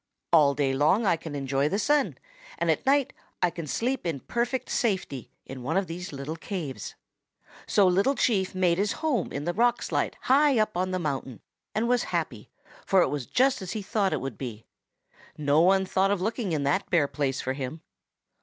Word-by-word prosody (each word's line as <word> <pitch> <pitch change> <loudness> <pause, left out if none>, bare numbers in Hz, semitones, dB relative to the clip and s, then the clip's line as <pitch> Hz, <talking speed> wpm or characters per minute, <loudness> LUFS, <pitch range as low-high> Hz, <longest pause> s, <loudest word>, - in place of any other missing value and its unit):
All 145 -4 +6
day 135 -2 +1
long 155 +11 +3
I 180 - +4
can 160 -2 -7
enjoy 140 +1 0
the 195 - 0
sun, 290 +6 +1 0.4
and - - +2
at - - -2
night 280 -1 +3 0.3
I 175 - +3
can 170 -3 -6
sleep 250 - -1
in 160 -6 -3
perfect 245 +2 -2
safety 190 - -1 0.2
in 135 -1 -8
one 150 +9 -1
of 195 - +1
these 180 +2 -6
little 140 +3 -5
caves.' 165 -11 -5 0.7
"So 200 - +4
Little 195 +10 +3
Chief 195 -8 +1
made 180 -1 +2
his 205 +2 +1
home 255 - 0
in 140 - -4
the 175 - 0
rock 240 +4 +2
slide - - -1
high 275 0 +4
up 215 -1 +1
on 185 +1 0
the 185 - -1
mountain 135 -7 -3 0.4
and 225 +2 +1
was 245 0 +2
happy, - - -3 0.3
for 190 -2 +4
it - - 0
was 145 -4 -3
just 260 -1 +2
as 185 - -5
he 215 - -4
thought 200 -2 0
it - - -1
would 135 -5 -6
be 115 -4 -6 0.7
no 145 +1 +3
one 190 +2 +4
thought 190 +1 +1
of 200 -2 +1
looking 220 0 -2
in 150 -3 0
that 170 +8 0
bare 170 -7 +3
place 140 -2 -2
for 130 - -2
him. 140 +4 -5
180 Hz, 200 wpm, -27 LUFS, 145-215 Hz, 0.7 s, All